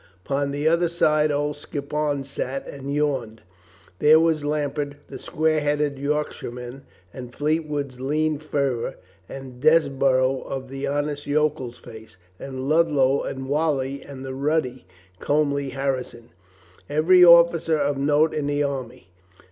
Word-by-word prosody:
Upon 140 0 -1
the 145 +2 -1
other 170 +2 +3
side 155 -2 +2
old 145 0 -1
Skippon 145 0 -3
sat 135 0 -5
and 140 0 -7
yawned. 135 -7 -2 0.6
There 155 +1 +6
was 160 -2 +1
Lambert, 145 -1 -2
the - - -8
square 155 0 0
headed 145 -1 -1
Yorkshire 150 0 -2
man, 125 +3 -9 0.3
and 125 -2 -9
Fleetwood's 150 -4 -2
lean 155 +2 0
fervor, 140 -6 -2 0.3
and 130 -2 -9
Desborough 135 -4 +3
of 130 -1 -6
the 135 +1 -4
honest 145 0 -2
yokel's 145 -5 0
face, 110 -4 -13 0.2
and 130 -1 -6
Ludlow 145 -4 +3
and 130 0 -5
Whalley 140 -2 -1
and 135 -2 -10
the 130 - -5
ruddy, 130 - -1 0.3
comely 140 -2 0
Harrison 130 -4 -4 0.3
— 90 0 -29
every 180 +3 +6
officer 170 -2 +6
of 145 -1 0
note 150 +3 +2
in 150 -2 -2
the 145 0 0
army. 130 -7 -5
145 Hz, 140 wpm, -23 LUFS, 135-150 Hz, 0.6 s, There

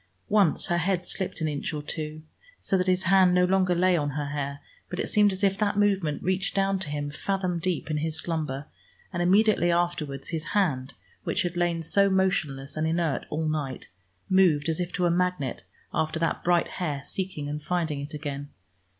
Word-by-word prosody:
Once 200 -6 +3
her 175 0 +2
head 180 +1 0
slipped 190 -3 -3
an 160 - +1
inch 150 +1 -3
or 150 - -4
two, 155 0 -5 0.3
so - - 0
that 185 0 +1
his 185 0 +2
hand 185 -1 +5
no 180 0 +5
longer 185 -1 +2
lay 185 +1 +4
on 145 -3 0
her 145 -1 -2
hair, 140 -1 -3 0.3
but 180 - -5
it - - 0
seemed 210 -1 +4
as 190 +1 -5
if 195 0 +2
that 205 -1 +1
movement 195 -7 +1
reached 185 +1 0
down 195 0 +2
to 180 -5 -3
him 145 0 -3
fathom 185 +2 -1
deep 170 -2 -2
in 150 - 0
his 155 +1 -1
slumber 150 -4 -2 0.5
and 175 - -1
immediately 190 0 +4
afterwards 170 -6 -1
his 165 -2 -2
hand, 135 -9 0 0.3
which - - 0
had 175 0 -3
lain 175 -1 0
so 200 +5 +3
motionless 155 -8 0
and 155 +1 0
inert 165 -2 0
all 155 +1 -1
night, 145 -4 -3 0.4
moved, 170 -5 +4
as 160 - -1
if 180 -1 -2
to 180 - 0
a 175 - +3
magnet, 180 -7 -1 0.3
after 155 +1 0
that 165 - -1
bright 175 -1 +3
hair, 145 -6 -2
seeking 185 -6 -4
and 150 +1 -4
finding 160 -3 -1
it 145 +2 -6
again. 145 -1 -5
170 Hz, 200 wpm, -27 LUFS, 150-185 Hz, 0.5 s, hand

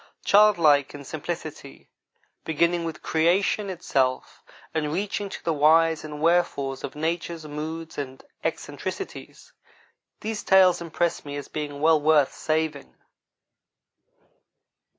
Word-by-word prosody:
Childlike 165 -10 +5
in 145 - -9
simplicity, 155 - -7 0.6
beginning 170 +2 +1
with 165 - -6
creation 185 +5 +1
itself, 135 -8 -1 0.3
and 150 -2 -1
reaching 200 +3 -2
to - - -8
the 165 - 0
whys 160 +2 +4
and 150 -1 -7
wherefores 155 -5 +1
of - - -6
nature's 165 +1 -3
moods 155 +2 -6
and 130 -2 -6 0.2
eccentricities, - - -6 0.7
these 215 0 -3
tales 185 -2 +5
impress 170 0 -1
me 145 -1 -7
as 145 - -7
being 145 -2 -5
well 160 -1 +4
worth 150 -2 +4
saving. 155 - -2
160 Hz, 110 wpm, -25 LUFS, 150-170 Hz, 0.7 s, Childlike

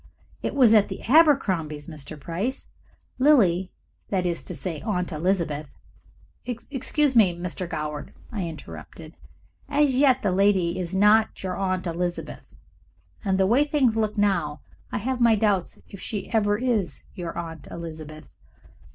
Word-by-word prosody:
It - - -3
was 250 -5 +6
at 210 -2 +5
the - - -7
Abercrombies', 200 - +3
Mr. 155 -1 -9
Price. 185 - -3 0.5
Lily 195 - +4 0.4
that 185 -2 0
is 170 -2 -1
to 180 - -6
say, 155 +2 -4
Aunt 180 -4 -2
Elizabeth 155 -3 -1 0.4
" - - -33 0.3
"Excuse 280 +1 +1
me, 190 -7 +5
Mr. 180 0 -4
Goward," 150 -2 -4 0.2
I 200 -7 -3
interrupted. 155 - -10 0.5
"As 290 -2 +3
yet 260 -1 +4
the 200 - +2
lady 185 -2 +2
is 180 +1 -4
not 210 +2 +4
your 185 -1 -2
Aunt 185 -1 -1
Elizabeth, 175 +1 -4 0.7
and 190 -3 +1
the 190 - +4
way 240 +9 +4
things 285 -6 +2
look 215 -1 -1
now 175 -8 +1 0.3
I - - -1
have 250 +4 -2
my 235 -2 +5
doubts 200 -4 0
if 195 - -11
she 205 -4 -5
ever 205 -2 +2
is 230 -6 -1
your 175 -3 -6
Aunt 165 -2 -6
Elizabeth." 155 -2 -9
190 Hz, 150 wpm, -25 LUFS, 170-225 Hz, 0.7 s, was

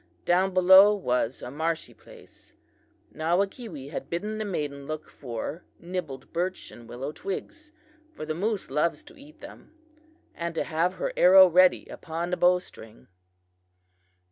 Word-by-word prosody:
Down 185 +2 +2
below 190 +3 +7
was 125 - -2
a 125 - -6
marshy 160 +3 -3
place. - - -18 0.6
Nawakewee 175 - -2
had - - -6
bidden 210 +6 -3
the 215 - -2
maiden 145 -7 -4
look 155 0 -5
for 130 +6 -6
nibbled 170 -6 -7
birch 180 +2 -3
and 120 -1 -14
willow 130 +4 -5
twigs, 305 - -7 0.4
for 230 - -8
the 155 - -3
moose 200 - -3
loves 150 - 0
to 330 +3 -16
eat 295 +1 -17
them, 320 - -13 0.6
and 170 0 -5
to - - 0
have 170 +3 -1
her - - -3
arrow 190 +1 +8
ready 180 +1 +4
upon 170 +2 -6
the 180 - 0
bow 180 +1 +4
string. 110 - -14
175 Hz, 145 wpm, -26 LUFS, 155-190 Hz, 0.6 s, arrow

